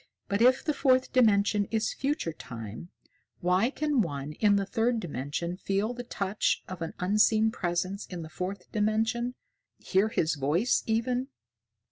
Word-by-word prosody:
"But 200 +2 0
if 255 +2 +4
the 305 - +1
Fourth 260 -2 +2
Dimension 210 -4 +4
is 220 0 0
future 275 - -2
Time, 115 - -8 0.5
why 185 +6 +2
can 290 -2 +1
one 145 -5 -3
in 205 +4 +3
the 200 -1 +1
third 230 +3 +1
dimension 170 - -4
feel 200 +4 -1
the 245 - -6
touch 200 -3 -1
of 185 -2 -7
an 165 - -4
unseen 215 +3 +3
presence 185 +1 -2
in 175 -3 -6
the - - -7
Fourth 180 +3 -6
Dimension 225 +3 0 0.4
hear 195 +2 +1
his 160 -7 +1
voice, 155 - +1
even?" 245 +3 0
205 Hz, 150 wpm, -28 LUFS, 175-235 Hz, 0.5 s, if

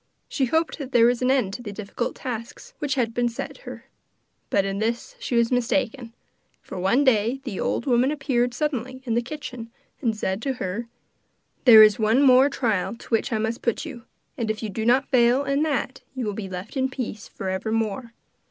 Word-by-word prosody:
She 270 - 0
hoped 320 +6 0
that 275 -2 -7
there 230 -1 +6
was 245 +1 +2
an 250 - +2
end 255 -8 +2
to 245 - -6
the 210 -4 -6
difficult 210 +3 -4
tasks 235 -2 -7
which 285 -2 -1
had 235 -4 0
been 240 0 +1
set 235 - -6
her; - - -10 0.6
but 200 -1 +2
in 195 0 -2
this 235 - -2
she 370 - -3
was 235 0 +3
mistaken, 245 0 0 0.5
for - - -8
one 230 +10 +3
day 240 0 +2
the 235 -8 -5
old - - -1
woman 250 0 +3
appeared 250 -4 0
suddenly 260 -3 -3
in 235 - -1
the 235 - +2
kitchen, 245 -3 -7 0.3
and 225 -5 0
said 190 0 -2
to 270 +1 -1
her: 225 0 -4 0.8
'There 220 -4 +10
is 215 0 +5
one 225 +5 +3
more 260 +1 +6
trial 230 -7 -1
to - - -15
which 225 +2 +1
I 220 - +1
must 220 +2 -2
put 235 +6 -1
you, 270 -7 -8 0.4
and 225 -2 -1
if 215 +1 -2
you 220 - -2
do 220 +3 -3
not 260 +3 +4
fail 250 +1 +4
in 275 +1 0
that 280 -4 -1
you 255 -3 -3
will 210 - -2
be 195 -1 -6
left 185 +6 -7
in 265 -1 +1
peace 235 -5 -5
for 190 - -5
evermore. 220 +4 -2
240 Hz, 205 wpm, -24 LUFS, 220-260 Hz, 0.8 s, There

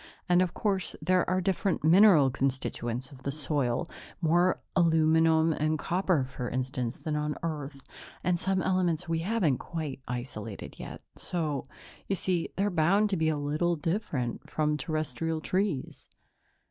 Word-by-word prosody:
And, 180 0 +4
of 185 -2 0
course, 195 -3 -1
there 185 -1 +2
are 185 0 +2
different 190 -1 0
mineral 165 -4 +6
constituents 130 -1 -2
of 135 -2 -13
the 140 - -3
soil 145 0 0 0.3
more 175 +2 +3 0.2
aluminum 160 -1 +4
and 155 +1 0
copper, 175 -2 +1
for 130 -1 -5
instance, 125 -1 -2
than 155 -1 -3
on 150 0 -1
Earth, 145 -4 -4 0.4
and 175 -1 +1
some 190 -1 0
elements 175 -2 +1
we 165 0 0
haven't 170 - +1
quite 155 -5 -5
isolated 115 -4 -6
yet. - - -8 0.2
So, 155 -6 -2 0.4
you 195 - +1
see, 180 -2 -1
they're 200 +1 +1
bound 190 +6 +3
to - - +2
be 160 -2 +1
a 155 - 0
little 150 +4 0
different 150 - -2
from 150 -1 +1
Terrestrial 155 +1 -2
trees." 185 -3 -2
160 Hz, 145 wpm, -29 LUFS, 140-180 Hz, 0.4 s, mineral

